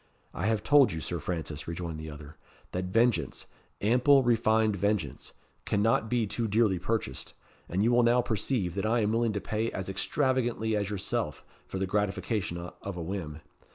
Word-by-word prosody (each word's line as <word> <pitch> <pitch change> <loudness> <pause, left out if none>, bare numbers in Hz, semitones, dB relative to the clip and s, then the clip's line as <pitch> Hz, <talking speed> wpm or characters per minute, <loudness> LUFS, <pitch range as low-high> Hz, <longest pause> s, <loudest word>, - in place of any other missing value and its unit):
"I 95 - -2
have 110 -2 +1
told 140 -4 +6
you, 80 - -3
Sir 85 +2 -3
Francis," 75 -2 -4
rejoined 85 -1 -4
the 80 0 -6
other, 75 +1 -10 0.4
"that 90 +1 -2
vengeance 100 - +1 0.4
ample, 125 +6 +5
refined 110 -2 +3
vengeance 100 -5 -1 0.3
cannot 110 +1 +1
be 120 -2 +1
too 115 +3 -2
dearly 105 -3 +2
purchased; 100 -9 -3 0.3
and 95 +4 +1
you 115 - +3
will 120 0 +5
now 120 +1 +4
perceive 110 -4 -1
that 100 +2 -2
I 115 +1 +2
am 105 0 +1
willing 115 -1 +1
to 100 - -1
pay 110 +4 -1
as 95 0 -4
extravagantly 120 0 0
as 100 -1 -1
yourself 100 -3 -3 0.2
for - - -5
the 95 - 0
gratification 100 -1 -1
of 90 +2 -7
a 85 - -3
whim. 80 -4 -5
105 Hz, 175 wpm, -29 LUFS, 90-115 Hz, 0.4 s, told